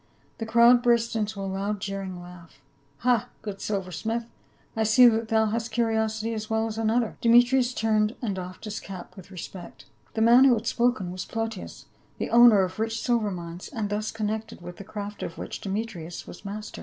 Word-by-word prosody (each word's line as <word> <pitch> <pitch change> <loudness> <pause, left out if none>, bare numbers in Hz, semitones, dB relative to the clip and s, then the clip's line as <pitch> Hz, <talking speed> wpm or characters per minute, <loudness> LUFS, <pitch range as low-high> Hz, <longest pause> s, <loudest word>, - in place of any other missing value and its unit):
The 225 - -4
crowd 235 +2 +6
burst 235 -1 +2
into 215 -1 -2
a - - -3
loud 195 +2 -2
jeering 195 -2 -5
laugh. 175 -1 -13 0.2
" 140 0 -37
Ha, 245 -4 +2
good 200 -2 -6
silver 195 -3 -3
smith, 225 +9 -3 0.5
I 225 - -1
see 220 +3 +7
that 225 -1 +2
thou 220 0 +3
hast 225 +1 -2
curi 225 0 +1
osity 220 +1 -1
as 215 -1 -5
well 220 0 +1
as 220 0 -4
another." 225 +1 0
Demetrius 245 +2 +5
turned 215 -1 +1
and 220 -5 -2
doffed 185 0 -7
his 215 -1 -4
cap 185 -3 -9
with 190 -1 -12
respect. 180 -1 -9 0.3
The 220 - 0
man 240 +4 +7
who 255 -3 +6
had 220 0 -5
spoken 235 -6 0
\\as 185 - -4
Plautius, 225 -3 -5 0.3
the - - -4
owner 235 -4 +7
of 185 +2 -4
rich 225 0 -1
siKcr 230 -3 0
mines, 175 -1 -7
and 215 -5 -4
thus 210 +1 -2
connected 220 0 -4
with 175 0 -9
the 200 - -8
craft 205 0 -7
of 165 - -5
which - - -6
Demetrius 195 -5 -5
was - - -11
master. 210 +1 -7
215 Hz, 200 wpm, -26 LUFS, 195-230 Hz, 0.5 s, see